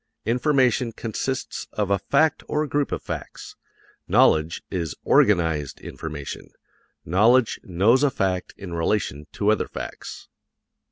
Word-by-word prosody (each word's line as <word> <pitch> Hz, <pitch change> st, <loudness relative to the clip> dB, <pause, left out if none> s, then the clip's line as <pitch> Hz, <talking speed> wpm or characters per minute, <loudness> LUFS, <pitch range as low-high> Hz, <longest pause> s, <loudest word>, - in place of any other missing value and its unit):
Information 125 Hz, -1 st, +2 dB
consists 120 Hz, +4 st, -4 dB
of 105 Hz, -2 st, -1 dB
a 100 Hz, -, +3 dB
fact 155 Hz, -, +2 dB
or 150 Hz, 0 st, 0 dB
a -, -, -3 dB
group 145 Hz, 0 st, -1 dB
of -, -, -3 dB
facts; -, -, -7 dB, 0.5 s
knowledge 80 Hz, +1 st, +3 dB
is 85 Hz, -6 st, -3 dB
organized 80 Hz, -8 st, +2 dB
information 75 Hz, -3 st, -7 dB, 0.6 s
knowledge 110 Hz, +8 st, +3 dB
knows 100 Hz, +9 st, +3 dB
a 145 Hz, -, +4 dB
fact 95 Hz, -6 st, -1 dB
in 95 Hz, -3 st, -8 dB
relation 80 Hz, -4 st, -1 dB
to 105 Hz, +1 st, +1 dB
other 110 Hz, -, 0 dB
facts. -, -, -8 dB
105 Hz, 125 wpm, -24 LUFS, 85-130 Hz, 0.6 s, a